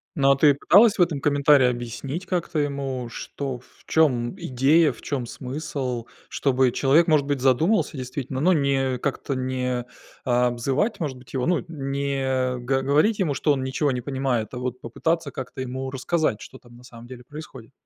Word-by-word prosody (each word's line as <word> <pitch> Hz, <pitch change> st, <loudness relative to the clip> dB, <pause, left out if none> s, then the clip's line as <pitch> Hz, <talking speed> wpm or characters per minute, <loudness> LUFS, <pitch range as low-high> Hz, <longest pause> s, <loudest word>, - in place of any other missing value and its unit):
Ну, 140 Hz, -2 st, +4 dB
а -, -, +5 dB
ты 145 Hz, 0 st, +5 dB
пыталась 210 Hz, +9 st, +5 dB
в -, -, +2 dB
этом 155 Hz, -6 st, +1 dB
комментарии 145 Hz, -2 st, +4 dB
объяснить 125 Hz, -, -4 dB
как-то 175 Hz, -4 st, -2 dB
ему, 135 Hz, -4 st, -2 dB
что 130 Hz, +1 st, -5 dB
в -, -, -25 dB
чём 125 Hz, -7 st, +2 dB
идея, 140 Hz, +5 st, +3 dB
в 115 Hz, -, -14 dB
чём 130 Hz, -5 st, -3 dB
смысл? 130 Hz, -3 st, -4 dB, 0.2 s
Чтобы 130 Hz, -2 st, +2 dB
человек, 150 Hz, +7 st, +3 dB
может 150 Hz, -3 st, +3 dB
быть, 140 Hz, -2 st, 0 dB
задумался 155 Hz, -, +2 dB
действительно, 130 Hz, +1 st, -5 dB
но 180 Hz, +5 st, +4 dB
не 135 Hz, -3 st, +1 dB
как-то 135 Hz, +1 st, -3 dB
не 125 Hz, -1 st, -2 dB, 0.4 s
обзывать, 125 Hz, -, 0 dB
может 140 Hz, -6 st, -3 dB
быть, 125 Hz, +1 st, -16 dB
его 130 Hz, -2 st, -1 dB
ну, 180 Hz, 0 st, +2 dB
не 135 Hz, -3 st, -1 dB
г 135 Hz, +2 st, 0 dB
говорить 150 Hz, +11 st, +2 dB
ему, 160 Hz, -7 st, +1 dB
что 150 Hz, -, +1 dB
он 135 Hz, -1 st, -2 dB
ничего 135 Hz, +2 st, 0 dB
не 125 Hz, -1 st, -2 dB
понимает, 130 Hz, -4 st, -2 dB
а -, -, -5 dB
вот 125 Hz, 0 st, -4 dB
попытаться 155 Hz, +5 st, -2 dB
как-то 130 Hz, 0 st, -7 dB
ему 130 Hz, +1 st, -4 dB
рассказать, 140 Hz, -3 st, -1 dB
что 130 Hz, -, -11 dB
там 120 Hz, -1 st, -18 dB
на 125 Hz, -, -16 dB
самом 115 Hz, -1 st, -13 dB
деле 125 Hz, -1 st, -10 dB
происходит. 135 Hz, -4 st, -11 dB
135 Hz, 180 wpm, -24 LUFS, 125-145 Hz, 0.4 s, а